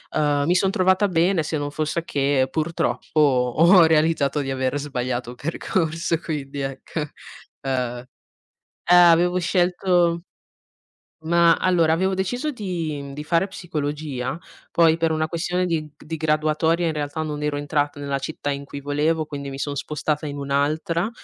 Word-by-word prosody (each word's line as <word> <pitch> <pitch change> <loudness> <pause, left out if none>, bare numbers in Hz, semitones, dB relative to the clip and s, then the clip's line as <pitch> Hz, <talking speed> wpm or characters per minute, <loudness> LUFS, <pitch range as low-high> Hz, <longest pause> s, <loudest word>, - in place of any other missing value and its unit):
mi 150 +2 +2
son 190 +1 +2
trovata 190 +2 +2
bene, 170 0 +2
se 155 +1 -2
non 145 0 -3
fosse 155 +2 -2
che 140 -2 +1
purtroppo, 160 0 -1
ho 150 +6 +5
realizzato 155 -2 +2
di 135 -1 -3
aver 130 +2 -1
sbagliato 125 -3 -3
percorso 165 +2 -1
quindi 145 -4 -5
ecco, 135 +4 -4 0.6
uhm 125 -2 -2 0.8
eh, 180 - +6
avevo 175 0 +6
scelto 175 -1 +1 1.0
Mah, 170 0 +4
allora 170 -3 +3
avevo 190 +3 +1
deciso 245 +11 -2
di 165 - -4
di 150 +1 -6
fare 170 +4 +1
psicologia, 150 - -4 0.3
poi 165 -1 +4
per 165 -1 +1
una 155 0 0
questione 180 +2 -1
di 165 -3 -1
g 150 - -20
di 160 +1 -4
graduatoria 155 +2 +1
in 160 - 0
realtà 150 +1 -3
non 150 -1 -4
ero 150 -1 -1
entrata 145 0 -1
nella 140 -1 -2
città 145 0 -4
in 140 0 -5
cui 140 0 -8
volevo, 150 +3 0
quindi 140 -2 -6
mi 135 - -7
sono 145 +1 -3
spostata 150 +1 -2
in 145 0 -5
un'altra, 150 +6 0
155 Hz, 150 wpm, -23 LUFS, 145-170 Hz, 1.0 s, eh